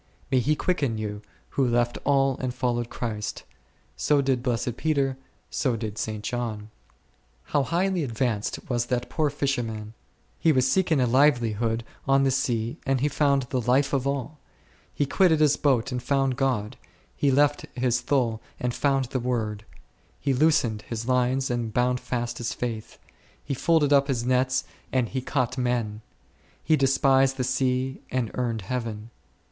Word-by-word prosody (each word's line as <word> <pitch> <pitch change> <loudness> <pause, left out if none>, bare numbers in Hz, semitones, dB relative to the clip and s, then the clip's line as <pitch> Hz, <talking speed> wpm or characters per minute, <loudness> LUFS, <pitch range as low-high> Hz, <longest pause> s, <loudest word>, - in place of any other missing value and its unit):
May 130 - +4
he 150 +5 +2
quicken 145 -10 0
you, 105 -1 -4 0.3
who 135 -2 +1
left 120 0 +1
all 135 -1 +3
and 130 -1 -2
followed 120 -2 -1
Christ! 105 -3 -4 0.5
so 150 -1 +2
did 135 -3 +1
blessed 120 -1 -1
Peter, 140 -3 0 0.4
so 130 -4 0
did 110 -2 -5
St. 110 -1 -3
John. 110 -3 -4 0.7
How 145 - +1
highly 175 +4 0
advanced 115 -4 -2
was 120 -3 -1
that 125 -1 -2
poor 155 -2 +1
fisherman! 120 -7 -2 0.5
he 165 - +4
was 130 -3 +3
seeking 165 -1 +2
a 125 - +3
livelihood 120 -4 +2 0.2
on 135 0 +4
the 135 - +3
sea 120 -3 -1
and 135 -1 +1
he 145 - +3
found 140 -1 +2
the 130 - +1
Life 135 +4 +2
of 135 -1 +1
all; 140 +2 -3 0.5
he 145 - 0
quitted 160 +1 +3
his 150 -2 +4
boat 135 -3 +1
and 125 0 -2
found 135 0 +1
God; 125 -3 -1 0.4
he 145 - +2
left 145 +2 +2
his 125 -1 +1
thole 120 -4 0 0.2
and 125 -1 -1
found 135 -1 +1
the 130 +1 -3
Word; 110 -4 -2 0.5
he 140 - 0
loosened 130 -7 +2
his 115 +1 -5
lines 130 +1 +1
and 120 -2 -2
bound 125 +2 +1
fast 120 -1 -3
his 120 - -3
faith; 115 -3 -5 0.5
he 140 - -3
folded 150 +1 +3
up 140 0 +5
his 125 -4 -1
nets 130 +1 +2 0.3
and 125 -4 +1
he 130 - -2
caught 130 -1 -1
men; 120 -4 -1 0.6
he 160 - +4
despised 135 -1 +3
the 130 - 0
sea 130 +1 0
and 125 -3 -1
earned 115 -4 -2
Heaven. 115 0 -4
125 Hz, 165 wpm, -26 LUFS, 120-140 Hz, 0.7 s, up